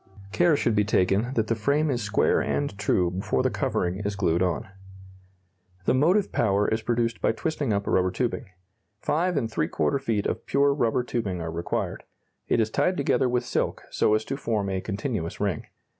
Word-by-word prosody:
Care 170 +1 +3
should 115 -5 +1
be 105 - +4
taken 100 +4 +1
that 110 - +2
the 115 - 0
frame 140 +7 +1
is 120 -2 -1
square 105 -1 +2
and 145 -7 -1
true 90 -4 +2
before 90 -8 -1
the - - +1
covering 90 +1 -1
is 105 -1 -3
glued 85 -4 +1
on. 90 -1 0 1.2
The - - +3
motive 180 +10 +3
power 100 -1 +2
is 110 +1 0
produced 115 0 -1
by - - +2
twisting 150 0 -2
up 100 0 0
rubber 95 0 +2
tubing. 120 +2 -2 0.5
Five 175 +2 0
and 120 -5 0
three 80 - 0
quarter 140 - 0
feet 115 -6 -1
of - - -3
pure 140 0 +3
rubber 125 -3 +1
tubing 105 -7 -2
are 80 -1 -4
required. 85 +1 -3 0.4
It - - +2
is 110 -1 +1
tied 180 +9 +1
together 135 -2 +2
with 120 0 0
silk - - -1
so 105 - +3
as 110 0 -1
to 135 - -3
form 110 -7 -1
a 95 -1 -1
continuous 100 -4 -3
ring. 100 -6 -2
110 Hz, 190 wpm, -26 LUFS, 100-135 Hz, 1.2 s, be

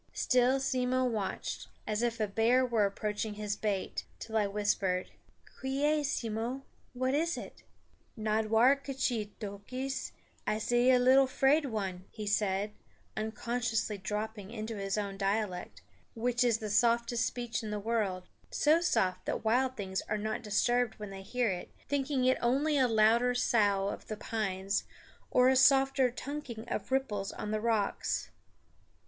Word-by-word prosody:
Still 255 +1 +3
Simmo 255 -1 +1
watched, 220 -5 -3 0.2
as 215 +1 -1
if 235 -1 0
a 215 - +2
bear 230 +5 +3
were 225 -4 +2
approaching 210 +1 -3
his 210 0 -2
bait, 205 -3 -2
till 225 - -7
I 210 -2 +3
whispered, 200 -2 0 0.5
"Quiee, 290 +3 +1
Simmo, 240 0 -2 0.3
what 255 +1 0
is 335 +4 +1
it?" - - -9 0.6
"Nodwar 220 +4 +3
k'chee 260 -6 -2
Toquis, 235 +7 -4 0.4
I 215 - +1
see 240 +3 +4
little 260 +2 +5
'Fraid 275 +3 +3
One'" 190 -6 -4
he 215 -2 -7
said, 205 0 0 0.4
unconsciously 225 -1 -2
dropping 210 +1 -4
into 225 0 -5
his 195 +1 -2
own 200 -2 -3
dialect, 195 -2 -2 0.3
which 245 +2 +1
is 235 -3 +3
the 215 -2 -5
softest 235 +2 +2
speech 240 -2 -3
in 220 - -5
the 210 - -2
world, 200 -4 -1 0.2
so 310 +3 +3
soft 185 - +1
that - - -2
wild 255 +3 +2
things 190 -2 -2
are 215 - 0
not 215 +2 -3
disturbed 240 +2 +1
when 210 -2 -7
they 195 0 -7
hear 240 +2 0
it, 180 -1 -5 0.2
thinking 275 -2 0
it 255 - +3
only 275 +6 +2
a 265 -3 +4
louder 230 +2 +4
sough 205 -5 +2
of - - -7
the 215 - -5
pines 200 -3 -2 0.5
or 250 0 +4
a 265 - +5
softer 270 0 +5
tunking 250 -3 -6
of - - -4
ripples 215 -7 0
on 210 - -5
the 215 0 -1
rocks. 220 -3 0
225 Hz, 150 wpm, -31 LUFS, 210-255 Hz, 0.6 s, little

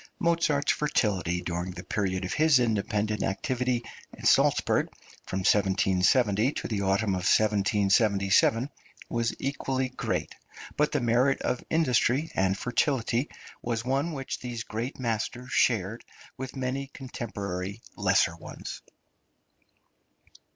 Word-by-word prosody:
Mozart's 165 -4 +2
fertility 95 - 0
during 90 +1 -3
the 90 0 -8
period 95 -2 -1
of 90 - -3
his 155 -2 +5
independent 105 -2 0
activity 125 +3 -1 0.3
at - - -9
Salzburg, - - +3 0.4
from 95 - -2
1770 100 +5 +3
to - - -4
the 105 -3 -2
autumn 100 +2 +1
of 95 - 0
1777, 105 +3 +3 0.4
was 115 -1 -1
equally 135 -1 -2
great, 130 - -3 0.4
but 150 0 +2
the 145 - +1
merit 125 +3 +2
of 125 - -1
industry 150 -1 +2
and 95 +1 +1
fertility 125 +2 0 0.3
was 120 -1 -2
one 135 +6 0
which 135 -2 -4
these 120 -2 -5
great 115 +5 -4
masters 120 +1 -3
shared 115 -1 +1 0.3
with 130 +1 -7
many 135 +1 -2
contemporary 100 -7 -5 0.2
lesser 85 - +2
ones. 85 - -8
115 Hz, 115 wpm, -28 LUFS, 100-130 Hz, 0.4 s, his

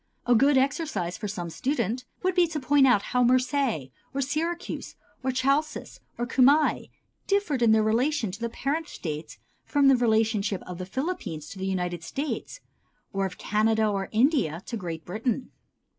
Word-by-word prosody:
A 245 - +4
good 275 +4 +5
exercise 270 - 0
for 210 - -5
some 175 -4 -5
student 250 - -1 0.2
would 370 0 +2
be 355 -1 +4
to 315 -2 -3
point 280 0 +4
out 225 -6 +4
how 250 - +3
Marseilles, 250 - +1 0.2
or - - 0
Syracuse 330 +6 -3 0.3
or 260 0 0
Chalcis 275 +4 0 0.2
or 240 - -1
Cumæ 275 +5 +3 0.4
differed 395 -10 +1
in 230 -2 +5
their 220 0 +4
relations 225 -2 +1
to - - -22
the 235 - -1
parent 300 +7 -2
States 155 -2 -6 0.3
from 285 -2 +3
the 270 - +7
relationship 220 -4 +1
of 180 -1 -8
the 185 - -5
Philippines 225 - -4
to 190 - -9
the 190 - -2
United 180 -2 -2
States, 290 - -4 0.5
or 195 0 0
of 180 - -11
Canada 220 +1 +2
or 195 -2 -2
India 220 - +2
to 235 - -5
Great 170 -6 -5
Britain. 225 +6 -2
240 Hz, 170 wpm, -27 LUFS, 195-280 Hz, 0.5 s, the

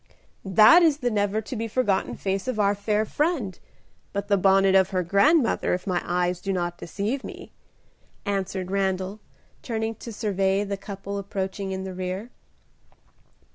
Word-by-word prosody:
"That 215 - +7
is 315 -4 +4
the 245 -4 -1
never 205 0 0
to 250 +4 -7
be 225 0 -2
forgotten 215 -4 0
face 195 +3 -2
of 250 -4 -2
our 200 -1 +3
fair 210 +1 0
friend, 275 - -1 0.5
but 200 +1 -3
the 200 - +5
bonnet 195 0 +4
of 190 -1 +5
her 185 -1 0
grandmother, 230 - +3
if 180 - -7
my 180 -3 0
eyes 180 0 -1
do 195 - -2
not 175 -2 -2
deceive 215 +10 -3
me," - - -9 0.7
answered 190 -2 -2
Randal, 190 +1 -1 0.4
turning 225 -1 -2
to 230 +1 -9
survey 195 -2 0
the 200 -1 -3
couple 200 0 -6
approaching 195 0 -4
in 190 0 -3
the 190 -1 -6
rear. 185 +5 -5
200 Hz, 160 wpm, -25 LUFS, 190-220 Hz, 0.7 s, That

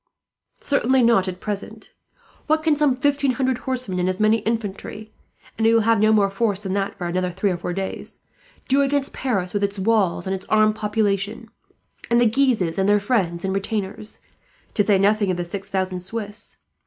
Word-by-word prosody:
"Certainly 265 -2 +2
not 230 -5 +4
at 185 -1 -5
present. 210 +2 -6 0.5
What 315 0 +2
can 315 -2 +3
some 290 -3 +2
fifteen 280 0 +1
hundred 260 0 0
horsemen 245 -8 -2
and 180 +1 +1
as 185 - -2
many 215 +1 +4
infantry 215 -1 -4 0.5
(and 225 - +3
he 225 - +5
will 225 - +5
have 225 0 +3
no 215 +1 +4
more 200 -2 +3
force 205 -1 -1
than 190 -1 -2
that, 200 0 -2
for 175 - -4
another 180 +1 -1
three 190 +3 -1
or 175 - -2
four 175 - -4
days) 190 +1 -5 0.5
do 275 +2 +3
against 280 0 0
Paris 195 -9 -2
with 205 -1 0
its 200 0 -1
walls 195 -4 +1
and 190 - -1
its 190 - -8
armed 215 0 +4
population, 210 +1 -1 0.6
and 235 - +4
the 240 - +4
Guises 225 -8 +1
and 190 +1 +2
their 205 0 +5
friends 195 -6 0
and 190 - -1
retainers, 200 +1 -3 0.5
to - - +2
say 205 -1 +3
nothing 205 +1 +2
of 180 - 0
the 175 - -3
six 195 +3 -7
thousand 185 -1 -1
Swiss? 205 +3 -5
210 Hz, 195 wpm, -22 LUFS, 190-230 Hz, 0.6 s, he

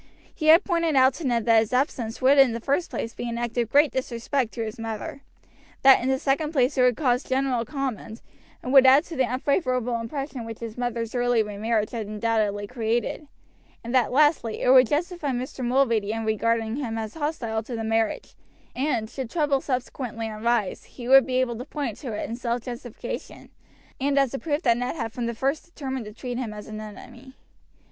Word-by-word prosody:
He 310 - -3
had 330 +5 +8
pointed 335 -4 0
out 260 0 +5
to 295 +1 -4
Ned 235 -3 0
that 230 -1 +6
his 220 +2 -2
absence 250 -3 -1
would 275 +2 +6
in 265 -4 +6
the 230 - -3
first 280 +8 -1
place 230 - -4
be 240 - -5
an 235 - -4
act 235 -1 -3
of 235 -2 0
great 290 +3 +4
disrespect 255 -1 -2
to 230 - -2
his 215 +1 -7
mother; 225 +4 -5 0.6
that 270 0 +8
in 255 - -1
the 265 - +2
second 295 +4 0
place 265 -1 +2
it 255 - +2
would 250 -2 +4
cause 250 -4 +2
general 260 -3 0
comment, 255 -5 -4 0.4
and 255 - -3
would 265 -1 +8
add 270 +4 +7
to 335 - -9
the 260 - +2
unfavorable 255 -3 0
impression 270 +1 -5
which 225 -1 -7
his 230 -2 -7
mother's 235 -2 -3
early 245 -2 +2
remarriage 210 +1 -1
had 225 -4 -4
undoubtedly 210 -1 -1
created; 235 +6 -2 0.6
and 235 +2 -5
that, 255 -4 +3
lastly, 290 -5 +2
it 250 - +4
would 255 -2 +7
justify 325 +1 -1
Mr. 255 0 -4
Mulready 235 -5 +2
in 225 0 -3
regarding 225 +2 0
him 235 -6 -3
as 220 -1 -4
hostile 280 -8 -2
to 235 +2 -7
the 225 - -3
marriage, 225 0 -1 0.4
and, 255 -5 0
should 255 +1 -6
trouble 290 -3 +1
subsequently 250 -3 -3
arise, 220 -2 -1
he 240 -2 -10
would 270 +1 +7
be 255 - -2
able 240 -3 0
to - - -4
point 280 -7 -4
to 255 - -6
it 210 - -3
in 230 - -4
self 235 0 -2
justification, 240 -2 -7 0.5
and 280 +1 0
as 275 -2 +3
a 270 - -3
proof 300 0 -2
that 235 -2 +3
Ned 245 +4 -2
had 230 -7 -4
from 240 0 -3
the 235 - -3
first 275 +6 -1
determined 265 -7 -5
to 210 - -8
treat 245 +3 -5
him 225 -4 -4
as 210 - -8
an 215 0 -7
enemy. 245 +5 -11
245 Hz, 210 wpm, -25 LUFS, 225-270 Hz, 0.6 s, had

